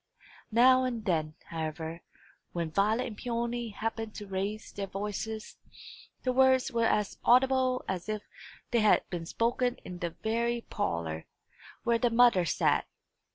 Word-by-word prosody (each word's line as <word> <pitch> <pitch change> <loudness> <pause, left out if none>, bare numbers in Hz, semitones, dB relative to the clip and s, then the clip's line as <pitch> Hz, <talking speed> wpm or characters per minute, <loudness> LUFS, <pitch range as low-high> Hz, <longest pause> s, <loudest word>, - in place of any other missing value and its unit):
Now 255 +3 +6
and 240 -4 -2
then, 155 -4 0
however, 160 0 -4 0.5
when 170 -2 -2
Violet 215 +8 +2
and 220 - -6
Peony 235 0 -2
happened 225 +1 -4
to 205 - -6
raise 200 +3 -3
their 200 -1 -4
voices, 210 +3 -5 0.7
the 255 - +1
words 260 0 +4
were 230 -1 +2
as 210 -1 0
audible 255 0 +4
as 190 +1 -3
if 215 -1 -2 0.5
they 240 - +3
had 215 -1 +4
been 170 -2 -4
spoken 245 +4 +1
in 180 -1 -7
the 175 - -1
very 235 +6 -1
parlour, 85 - -3 0.6
where 235 0 +2
the 240 - +3
mother 230 -6 +5
sat. - - +2
220 Hz, 145 wpm, -30 LUFS, 190-240 Hz, 0.7 s, Now